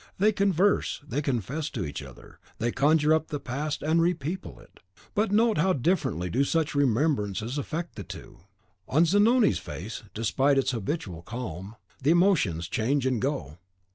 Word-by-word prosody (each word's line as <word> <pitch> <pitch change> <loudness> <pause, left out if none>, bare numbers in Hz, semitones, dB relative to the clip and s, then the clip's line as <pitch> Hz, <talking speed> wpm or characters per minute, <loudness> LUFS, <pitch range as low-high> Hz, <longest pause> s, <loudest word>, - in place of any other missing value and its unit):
They 210 +3 +4
converse; 200 -1 +2
they 140 +4 -1
confess 140 +3 -2
to 100 -8 -4
each 70 - -5
other; - - -13 0.2
they 120 +1 0
conjure 150 +3 +3
up 160 0 +1
the 145 - -4
past, 145 +4 -4
and 160 +2 +3
repeople 170 +1 -2
it; - - -19 0.3
but 210 -1 +1
note 220 +1 +3
how 190 0 +3
differently 130 - 0
do 125 +10 +1
such 160 +2 0
remembrances 130 -3 0
affect 165 +4 -4
the 100 - -5
two. - - -10 0.5
On 160 +5 +4
Zanoni's 210 +6 +4
face, 90 +10 -7
despite 135 +6 +2
its 135 -1 +2
habitual 110 - -4
calm, 100 -1 -6 0.3
the 135 - +1
emotions 160 - +3
change 130 +7 0
and 130 -4 0
go. 105 - -3
145 Hz, 160 wpm, -27 LUFS, 115-165 Hz, 0.5 s, They